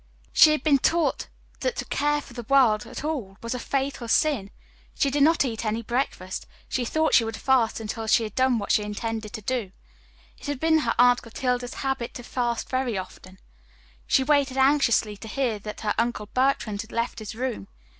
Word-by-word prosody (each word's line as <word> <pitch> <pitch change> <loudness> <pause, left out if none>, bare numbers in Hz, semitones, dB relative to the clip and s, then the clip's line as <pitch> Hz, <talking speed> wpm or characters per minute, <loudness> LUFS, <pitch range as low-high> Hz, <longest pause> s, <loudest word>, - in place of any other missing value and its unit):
She 310 - +8
had 305 -3 0
been 285 -3 +4
taught 335 +4 +1 0.3
that - - -1
to - - -4
care 295 0 0
for 270 - -14
the 240 -3 -8
world 245 -6 +4
at - - -7
all 255 -11 -4
was 230 +2 -3
a 250 - -4
fatal 270 -2 -2
sin. 235 -5 +2 0.5
She 275 - +1
did 285 +1 0
not 310 0 +4
eat 230 -3 -3
any 220 +1 -2
breakfast. 230 -6 -3 0.2
She 250 - -1
thought 315 +6 +1
she 230 - +6
would 225 0 -4
fast 255 -5 +2
until 225 0 -5
she 220 +1 +4
had 215 -2 -5
done 260 -1 +2
what 205 - -2
she - - +4
intended 215 +1 -4
to 220 - -6
do. 235 -5 -2 0.7
It - - -9
had 290 -2 -3
been 320 +1 +3
her 235 -6 0
Aunt 245 0 +5
Clotilde's 245 +1 -2
habit 270 -3 -3
to 245 - -7
fast 240 -1 -2
very 255 -5 -1
often. 185 0 -9 0.7
She 265 - +3
waited 280 -2 +2
anxiously 265 -6 +3
to 220 - -10
hear 235 -2 -1
that 210 +1 -8
her 210 -1 0
Uncle 230 -2 -1
Bertrand 230 -3 0
had 225 - -12
left 235 +1 -2
his 215 0 -7
room. 240 - -3
245 Hz, 200 wpm, -25 LUFS, 220-275 Hz, 0.7 s, She